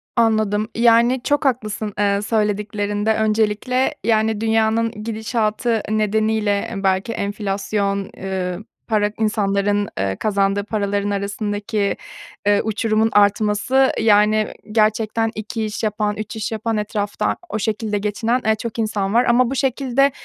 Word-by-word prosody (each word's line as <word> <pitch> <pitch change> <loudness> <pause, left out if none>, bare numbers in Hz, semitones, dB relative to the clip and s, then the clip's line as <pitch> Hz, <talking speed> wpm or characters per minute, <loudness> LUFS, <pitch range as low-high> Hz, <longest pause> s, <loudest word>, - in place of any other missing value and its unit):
Anladım, 215 -2 +2
yani, 235 +2 +4
çok 290 0 +1
haklısın, 215 -5 -1
eee, 200 -1 +2
söylediklerinde 210 0 0
öncelikle, 220 +4 +1
yani, 220 -1 +1
dünyanın 225 0 +2
gidişatı 220 +1 -1
nedeniyle 215 0 0
belki 190 +3 +1
enflasyon, 200 -1 -2
ııı, 185 0 -3 0.2
para 210 -2 +1
insanların, 205 -1 +1
eee, 95 0 -1
kazandığı 200 - 0
paraların 205 -1 -1
arasındaki, 205 +1 -2 0.5
eee, 205 0 +4
uçurumun 220 +1 +1
artması, 210 +6 +3
yani, 215 0 +3 0.2
gerçekten 220 +1 +1
2 215 +1 -4
iş 215 +1 -5
yapan, 210 -1 0
3 215 0 -5
iş 220 0 -3
yapan, 220 0 -2
etrafta 210 -1 -1
o 220 - -2
şekilde 215 0 -1
geçinen, 225 +4 -1
eee, 220 0 +3
çok 230 +1 -6
insan 210 -3 -1
var 240 +2 +4
ama 240 +1 +3
bu 270 - -3
şekilde, 270 +1 +2
215 Hz, 125 wpm, -20 LUFS, 205-225 Hz, 0.5 s, yani